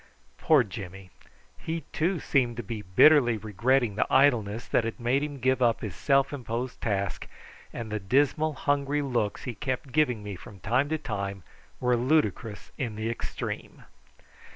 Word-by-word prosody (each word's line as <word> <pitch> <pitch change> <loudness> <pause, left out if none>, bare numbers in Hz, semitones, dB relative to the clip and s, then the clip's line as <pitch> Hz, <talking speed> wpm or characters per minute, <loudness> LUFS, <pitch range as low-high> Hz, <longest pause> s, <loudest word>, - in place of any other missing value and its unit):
Poor 150 -5 +5
Jimmy! 95 -2 -9 0.5
He 165 0 -3
too 170 +2 0
seemed 125 -6 +1
to 120 - -4
be 105 +1 -5
bitterly 120 - +5
regretting 110 +3 +1
the 105 - -1
idleness 120 -5 +3
that - - +2
had 115 +2 -4
made 120 +4 +1
him 145 -1 -4
give 130 +1 +1
up 120 -2 +3
his 105 -6 -5
self 135 0 +2
imposed 125 -1 -4
task, 100 -4 -2 0.4
and 115 -2 -6
the 110 - -1
dismal 145 +9 +2
hungry 145 +1 0
looks 120 -6 -1
he 125 - -4
kept 130 +2 -4
giving 125 -8 +1
me 100 -1 -5
from 95 +2 -12
time 125 +6 +1
to 160 - 0
time 100 - -4 0.4
were 125 -1 +2
ludicrous 125 -4 0
in 120 -6 -2
the 110 +2 -2
extreme. 115 - -6
120 Hz, 160 wpm, -27 LUFS, 105-140 Hz, 0.5 s, Poor